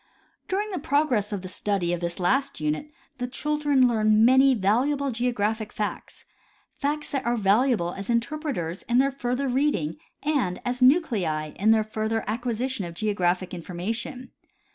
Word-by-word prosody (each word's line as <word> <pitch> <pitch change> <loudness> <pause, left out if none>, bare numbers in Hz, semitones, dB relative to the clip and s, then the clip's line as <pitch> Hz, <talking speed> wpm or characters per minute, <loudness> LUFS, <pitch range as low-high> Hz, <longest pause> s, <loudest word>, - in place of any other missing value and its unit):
During 415 +3 -1
the 370 - -3
progress 280 -8 +1
of 200 -2 -4
the - - -5
study 185 -2 -1
of 175 - -2
this 170 +1 -4
last 270 +10 +1
unit 155 - -2 0.3
the 245 - -2
children 290 0 +2
learn 215 -1 +4
many 265 +2 +6
valuable 260 +8 +1
geographic 225 -3 -1
facts, 210 -1 -5 0.5
facts 295 +1 -2
that 275 - -1
are 235 +1 0
valuable 205 -3 +2
as 195 +2 -7
interpreters 235 - -2
in 240 - +3
their 275 +2 +4
further 260 +1 -2
reading 250 - 0 0.3
and 275 -12 0
as 250 +1 -2
nuclei 210 - +3
in 205 +7 0
their 220 -1 +5
fur 215 0 -3
ther 225 0 0
acquisition 240 +1 -2
of 170 -1 -7
geographic 185 -2 0
information. 220 - -5
230 Hz, 155 wpm, -25 LUFS, 195-270 Hz, 0.5 s, many